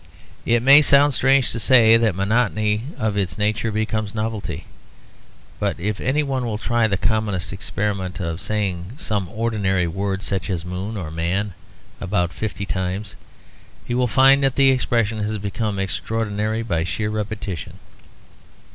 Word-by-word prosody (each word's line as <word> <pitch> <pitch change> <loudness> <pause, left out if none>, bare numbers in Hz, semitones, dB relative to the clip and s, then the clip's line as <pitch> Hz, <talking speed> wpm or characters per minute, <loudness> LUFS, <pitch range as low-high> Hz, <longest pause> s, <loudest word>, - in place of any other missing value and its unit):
It 120 0 +3
may 140 +3 +8
sound 140 0 +5
strange 135 0 +3
to 115 - -3
say 115 -2 +6
that 115 -5 +2
monotony 105 +1 +1
of 110 -2 -1
its 95 -3 -1
nature 105 +2 0
becomes 110 0 -2
novelty. 105 -7 -4 0.9
But - - -1
if 105 +3 -2
any 145 +4 +1
one 135 -3 -2
will 115 -3 -2
try 120 +1 +1
the 100 -2 0
common 110 0 0
experiment 95 0 -3
of 85 -1 -3
saying 100 -2 -2
some 105 - -2
ordinary 105 -5 0
word 95 +3 -2
such 100 -1 -2
as 90 -2 -2
"moon" 95 +5 -4
or 85 -5 -5
"man" 90 +5 -1 0.5
about 90 -3 -1
fifty 105 -2 -4
times, 95 +2 -3 0.7
he 120 - -3
will 125 0 +2
find 135 +3 +5
that 135 -2 +2
the 135 -1 +5
expression 115 -4 0
has 105 +1 -2
become 105 +1 -3
extraordinary 110 +2 -2
by 85 -7 -1
sheer 105 +4 -2
repetition. 105 -5 -5
105 Hz, 150 wpm, -21 LUFS, 95-115 Hz, 0.9 s, may